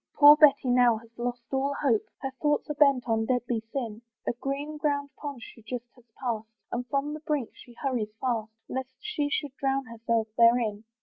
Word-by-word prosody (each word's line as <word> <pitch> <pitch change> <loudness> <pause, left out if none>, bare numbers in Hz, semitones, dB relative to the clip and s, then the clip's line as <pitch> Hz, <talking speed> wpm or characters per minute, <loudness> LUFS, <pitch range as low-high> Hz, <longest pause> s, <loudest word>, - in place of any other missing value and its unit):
Poor 290 0 +10
Betty 285 -4 +5
now 245 -2 +5
has 225 +1 -14
lost 240 0 -3
all 275 +1 0
hope, 240 -7 +3 0.2
Her 270 - -2
thoughts 295 +1 +1
are - - 0
bent 280 -4 +4
on 225 -1 +1
deadly 245 -2 0
sin; 230 -5 -4 0.2
A - - 0
green 280 +5 -4
grown 285 -1 0
pond 280 -4 -7
she 230 - -12
just 235 +2 -5
has 245 -3 -21
pass'd, 230 -4 -2 0.2
And 245 +1 -3
from 280 +2 -1
the 305 - -5
brink 295 -6 -2
she 240 - -15
hurries 245 -6 -2
fast, 225 -4 -1 0.2
Lest 260 0 -4
she 380 -9 -2
should 285 -1 -2
drown 270 0 0
herself 230 -1 -1
therein. 230 -2 +4
255 Hz, 190 wpm, -28 LUFS, 230-285 Hz, 0.2 s, Poor